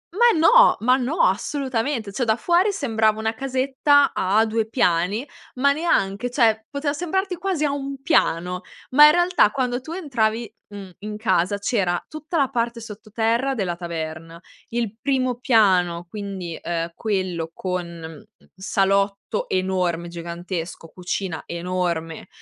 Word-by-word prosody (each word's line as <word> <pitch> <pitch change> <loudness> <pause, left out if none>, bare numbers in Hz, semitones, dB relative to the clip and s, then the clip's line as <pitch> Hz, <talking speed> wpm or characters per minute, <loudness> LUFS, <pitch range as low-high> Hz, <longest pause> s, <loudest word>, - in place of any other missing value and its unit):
Ma 475 -4 +4
no! - - +6
Ma 250 +3 +4
no, 270 +7 -1
assolutamente. 260 -5 0
Cioè, 245 +2 -1
da 220 -1 +3
fuori 355 - +2
sembrava 220 - +1
una 220 +1 -1
casetta 270 +3 +2
a 205 +4 +2
2 220 0 -1
piani, 200 - +1 0.3
ma 280 +2 +3
neanche, 245 - 0
cioè, 225 -4 +2
poteva 285 +1 -2
sembrarti 365 +4 -2
quasi 365 -4 -2
a 285 - +1
1 275 -1 -5
piano, 180 - +1 0.3
ma, 295 +3 +8
in - - +7
realtà, 350 - +4
quando 250 0 -2
tu 315 - -9
entravi, 235 - -1
mhmm, 200 -2 -10
in 210 0 -6
casa, 195 -2 +1
c'era 195 -5 0
tutta 315 +2 -5
la 275 -3 +2
parte 235 0 -2
sottoterra 225 +4 -2
della 185 -5 -2
taverna, 165 -1 -6 0.3
il 230 -2 -2
primo 255 -3 0
piano, 185 -8 +3
quindi, 195 -4 -6
ehm, 170 0 -3
quello 185 -6 -2
con, 180 -1 -3
mhmm, 165 +2 -10 0.3
salotto 195 +1 +1 0.3
enorme, 180 -2 -1
gigantesco, 170 -1 -6
cucina 180 -1 -4
enorme, 170 -2 -3
220 Hz, 140 wpm, -22 LUFS, 180-270 Hz, 0.3 s, ma